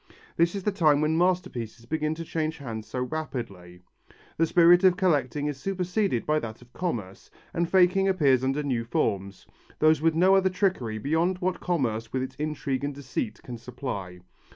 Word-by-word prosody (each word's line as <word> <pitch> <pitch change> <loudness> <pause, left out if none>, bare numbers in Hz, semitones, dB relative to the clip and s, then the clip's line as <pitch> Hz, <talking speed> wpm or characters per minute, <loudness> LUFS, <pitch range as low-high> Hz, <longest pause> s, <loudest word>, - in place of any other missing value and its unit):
This 170 +3 +2
is 195 - -4
the 210 - +1
time 155 -7 +3
when 155 +1 +1
masterpieces 160 -11 -1
begin 155 +3 -1
to 165 +1 -6
change 160 0 -2
hands 115 -7 -6
so 125 - -4
rapidly. 115 - -6 0.6
The 165 - +3
spirit 175 +2 +6
of 185 -1 +5
collecting 145 -6 +1
is 145 -2 -3
superceded 185 - -1
by 155 0 +2
that 110 -4 -7
of 125 - -24
commerce, 115 - -4 0.2
and 170 -1 0
faking 190 +1 +4
appears 140 -9 +3
under 135 +3 0
new 125 -5 -1
forms, 100 - -2 0.3
those 155 -1 +4
with 165 0 +2
no 185 +3 +5
other 190 -1 +3
trickery 180 - -1
beyond 160 - 0
what 185 -1 -2
commerce 115 -10 -1
with 130 -1 -1
its 130 - -6
intrigue 145 -3 -2
and 145 -1 -3
deceit 125 -5 -4
can 120 -2 -8
supply. 105 -8 -6
150 Hz, 175 wpm, -26 LUFS, 120-175 Hz, 0.6 s, spirit